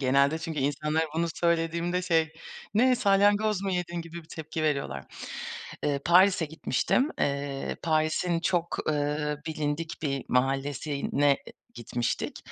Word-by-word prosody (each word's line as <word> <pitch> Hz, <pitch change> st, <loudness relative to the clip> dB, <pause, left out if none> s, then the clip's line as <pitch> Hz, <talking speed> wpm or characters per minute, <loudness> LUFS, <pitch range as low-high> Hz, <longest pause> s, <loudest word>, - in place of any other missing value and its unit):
Genelde 140 Hz, +4 st, +3 dB
çünkü 160 Hz, -2 st, -4 dB
insanlara 150 Hz, +3 st, +1 dB
bunu 170 Hz, +1 st, +1 dB
söylediğimde 170 Hz, +1 st, +1 dB
şey, 165 Hz, -3 st, +2 dB, 0.4 s
Ne, 250 Hz, +3 st, +5 dB
salyangoz 205 Hz, -1 st, +3 dB
mu 195 Hz, -, -1 dB
yedin? 175 Hz, -1 st, -2 dB
gibi 165 Hz, +1 st, -9 dB
bir 160 Hz, -, -22 dB
tepki 160 Hz, 0 st, -5 dB
veriyorlar. 140 Hz, -, -1 dB, 0.8 s
Iıı, 140 Hz, -1 st, +1 dB
Paris'e 185 Hz, 0 st, +5 dB
gitmiştim. 160 Hz, -, +1 dB
Iıı, 140 Hz, -1 st, -1 dB
Paris'in 160 Hz, +2 st, +1 dB
çok, 175 Hz, -1 st, 0 dB
ııı, 150 Hz, 0 st, 0 dB
bilindik 155 Hz, +1 st, -3 dB
bir 140 Hz, -3 st, -1 dB
mahallesine 140 Hz, +2 st, +1 dB, 0.4 s
gitmiştik. 120 Hz, 0 st, -2 dB
160 Hz, 120 wpm, -28 LUFS, 145-175 Hz, 0.8 s, Ne